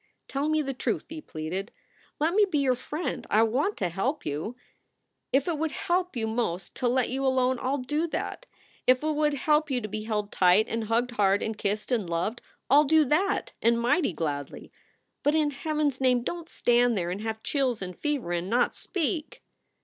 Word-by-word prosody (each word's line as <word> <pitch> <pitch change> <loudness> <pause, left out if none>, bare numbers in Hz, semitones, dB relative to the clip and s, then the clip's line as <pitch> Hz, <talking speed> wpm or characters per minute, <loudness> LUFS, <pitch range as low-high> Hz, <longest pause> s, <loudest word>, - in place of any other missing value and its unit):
"Tell 280 +3 -1
me 310 0 +2
the 270 -1 -3
truth," 255 - -2
he 315 0 -7
pleaded. 180 - -5 0.5
"Let 315 +3 +2
me 420 +2 +5
be 370 -6 -1
your 270 -3 +3
friend. 295 +7 -4
I 215 +2 +5
want 265 - 0
to 180 - 0
help 255 - -2
you. 155 +11 -3 0.8
If 270 +3 +2
it 325 -4 -1
would 320 0 0
help 360 +1 -1
you 230 -2 -1
most 220 -6 -2
to 250 - 0
let 250 0 +2
you 270 +2 -2
alone, 260 -1 +2
I 255 - -2
ll 280 - +1
do 295 +5 -1
that. - - -4 0.4
If 255 +2 +5
it 310 - +1
would 300 -1 +1
help 300 +2 +2
you 260 -2 +1
to 215 - -5
be 215 +1 -5
held 210 -2 -2
tight 185 +4 +4
and 230 -1 -2
hugged 235 +3 +1
hard 200 -3 +2
and 220 - -2
kissed 210 +3 -2
and 215 -8 0
loved 175 +8 -1 0.3
I 275 - +6
ll 300 - +6
do 315 +1 +5
that, 375 +9 +1
and 235 0 +3
mighty 245 - +2
gladly. 145 -4 -4 0.5
But 295 +2 +2
in 305 -2 +2
Heaven 305 +1 0
s 270 -1 -9
name, 250 -2 +3
don 340 +5 -4
t - - -24
stand 240 -1 +3
there 175 -1 -1
and 190 +3 -4
have 220 0 -4
chills 265 -5 0
and 180 -2 -6
fever 290 - -2
and 175 +1 -2
not 240 +3 +2
speak!" 325 -3 -3
250 Hz, 210 wpm, -27 LUFS, 215-300 Hz, 0.8 s, I